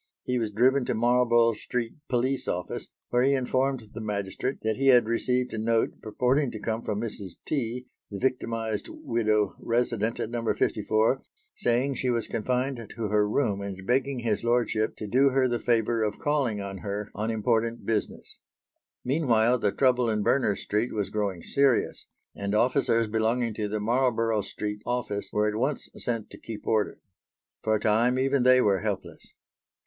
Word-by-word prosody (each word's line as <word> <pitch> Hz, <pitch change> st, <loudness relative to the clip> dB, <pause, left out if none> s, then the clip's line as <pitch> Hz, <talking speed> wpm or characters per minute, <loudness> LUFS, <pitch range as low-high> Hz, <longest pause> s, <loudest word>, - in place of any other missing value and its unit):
He 125 Hz, -1 st, 0 dB
was 110 Hz, -2 st, -1 dB
driven 130 Hz, +6 st, +3 dB
to -, -, -1 dB
Marlborough 120 Hz, 0 st, +4 dB
Street 115 Hz, +2 st, -3 dB, 0.2 s
police 130 Hz, +2 st, 0 dB
office 90 Hz, 0 st, -3 dB, 0.2 s
where 120 Hz, -, +2 dB
he 135 Hz, +2 st, +4 dB
informed 130 Hz, -1 st, 0 dB
the 115 Hz, -, -6 dB
magistrate 105 Hz, +4 st, -3 dB
that 110 Hz, 0 st, +1 dB
he 135 Hz, +1 st, +1 dB
had 125 Hz, -3 st, +7 dB
received 125 Hz, +2 st, 0 dB
a 110 Hz, -, -3 dB
note 115 Hz, +1 st, 0 dB
purporting 125 Hz, +5 st, +1 dB
to 110 Hz, -, -7 dB
come 110 Hz, +2 st, -2 dB
from 105 Hz, -2 st, -3 dB
Mrs. 105 Hz, -5 st, -5 dB
T., 125 Hz, -3 st, -2 dB, 0.2 s
the 100 Hz, -, -5 dB
victimised 115 Hz, -3 st, -2 dB
widow 110 Hz, -3 st, 0 dB
resident 115 Hz, -2 st, 0 dB
at 110 Hz, -, -3 dB
No. 120 Hz, -1 st, -3 dB
54, 110 Hz, +5 st, +1 dB, 0.3 s
saying 125 Hz, +4 st, +1 dB
she 130 Hz, -1 st, -1 dB
was 115 Hz, -3 st, 0 dB
confined 125 Hz, +4 st, -1 dB, 0.2 s
to 110 Hz, -2 st, -3 dB
her 105 Hz, 0 st, +2 dB
room 105 Hz, -5 st, 0 dB
and 95 Hz, -1 st, -6 dB
begging 130 Hz, +2 st, 0 dB
his 110 Hz, -3 st, 0 dB
lordship 120 Hz, -2 st, +1 dB
to 110 Hz, -, -6 dB
do 130 Hz, +7 st, +4 dB
her 130 Hz, -1 st, +2 dB
the 120 Hz, -1 st, -1 dB
favour 115 Hz, -1 st, +1 dB
of 105 Hz, -1 st, -1 dB
calling 140 Hz, -8 st, 0 dB
on 100 Hz, -1 st, -5 dB
her 100 Hz, +3 st, -4 dB
on 110 Hz, +2 st, -2 dB
important 115 Hz, +1 st, 0 dB
business. 110 Hz, -2 st, -3 dB, 0.7 s
Meanwhile, 125 Hz, -4 st, +3 dB
the 105 Hz, -3 st, +1 dB
trouble 125 Hz, -2 st, +2 dB
in 105 Hz, -1 st, 0 dB
Berners 115 Hz, -6 st, +2 dB
Street 110 Hz, +4 st, -1 dB
was 100 Hz, -3 st, -2 dB
growing 100 Hz, -5 st, -2 dB
serious, 140 Hz, -3 st, +1 dB, 0.3 s
and 100 Hz, +1 st, -2 dB
officers 120 Hz, -1 st, +2 dB
belonging 115 Hz, +2 st, 0 dB
to 105 Hz, 0 st, -2 dB
the 105 Hz, +1 st, -2 dB
Marlborough 115 Hz, -1 st, +1 dB
Street 105 Hz, +1 st, -5 dB
office 120 Hz, -4 st, -2 dB
were 105 Hz, 0 st, +1 dB
at 105 Hz, -, 0 dB
once 135 Hz, +4 st, -1 dB
sent 115 Hz, -3 st, -3 dB
to -, -, -11 dB
keep 110 Hz, -2 st, -8 dB
order. 110 Hz, -2 st, 0 dB, 0.6 s
For 110 Hz, 0 st, +1 dB
a -, -, 0 dB
time 115 Hz, +4 st, +2 dB
even 135 Hz, +1 st, +2 dB
they 130 Hz, +1 st, +6 dB
were 100 Hz, -4 st, +3 dB
helpless. -, -, -5 dB
115 Hz, 175 wpm, -27 LUFS, 105-125 Hz, 0.7 s, had